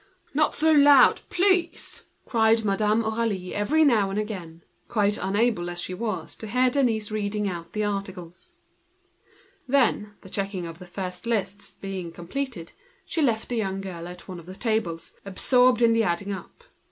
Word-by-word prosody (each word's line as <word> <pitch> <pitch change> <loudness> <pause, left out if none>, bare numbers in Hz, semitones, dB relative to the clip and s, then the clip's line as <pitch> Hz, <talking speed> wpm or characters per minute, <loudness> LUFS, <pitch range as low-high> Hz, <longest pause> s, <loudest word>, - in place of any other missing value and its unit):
"Not 305 +2 +2
so 320 +1 +3
loud, 285 -3 +7
please!" 360 -3 +1 0.2
cried 225 -1 +3
Madame 210 +3 +2
Aurélie, 220 +5 0
now 220 -8 +3
and 195 - -3
again, 180 -6 -5 0.2
quite 210 -2 +1
unable 205 -2 +1
to 185 +4 -4
hear 250 +4 +3
Denise 230 -6 +1
reading 210 -1 -1
out 170 -3 -6
the 215 - -1
articles. 195 - -5 1.1
When 245 -6 +2
the 190 - -13
checking 195 -3 -3
of 165 0 -8
the 180 - -11
first 180 +3 -6
lists 205 -3 -2
was 185 -4 -6
finished, 185 0 -5 0.3
she 325 - -2
left 230 -6 +1
the 245 - -2
young 195 -3 -1
girl 175 -3 -6
at 180 0 -10
one 185 -2 -7
of 170 - -14
the 185 - -8
tables, 195 -8 -2
absorbed 245 +5 +3
in 230 -1 +5
the 230 - +3
adding 195 0 -1
up. 185 -3 -10
210 Hz, 155 wpm, -25 LUFS, 185-235 Hz, 1.1 s, loud